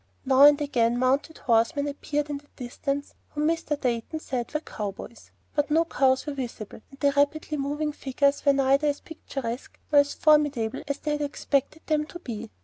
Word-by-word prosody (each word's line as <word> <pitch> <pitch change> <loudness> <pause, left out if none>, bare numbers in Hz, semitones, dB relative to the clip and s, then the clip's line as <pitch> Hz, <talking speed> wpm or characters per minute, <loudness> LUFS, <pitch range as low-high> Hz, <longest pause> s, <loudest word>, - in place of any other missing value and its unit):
Now 265 0 +4
and 290 0 +7
again 240 -5 +1
mounted 270 +5 +1
horsemen 250 +5 +1
appeared 290 +1 -2
in 285 - -3
the 290 - -24
distance 275 +3 -4 0.2
whom 300 0 0
Mr. 325 -3 -1
Dayton 245 +4 -2
said 250 -5 -4
were 300 - -1
"cow 210 -9 -5
boys;" 215 +4 -11 0.2
but 290 0 0
no 325 +2 +3
cows 265 -4 +2
were 295 - -3
visible, 235 -6 -6
and 275 - -16
the 285 -1 +3
rapidly 285 +2 +1
moving 295 +2 -1
figures 280 0 0
were 280 - +5
neither 275 +2 +3
as 290 -1 0
picturesque 270 -6 -6
nor 290 -1 +8
as 285 0 -4
formidable 290 -7 +2
as 280 -1 -1
they 300 - -3
had 295 0 -1
expected 285 +1 -1
them 300 -1 0
to 345 - -8
be. 235 - -7
285 Hz, 190 wpm, -26 LUFS, 260-295 Hz, 0.2 s, nor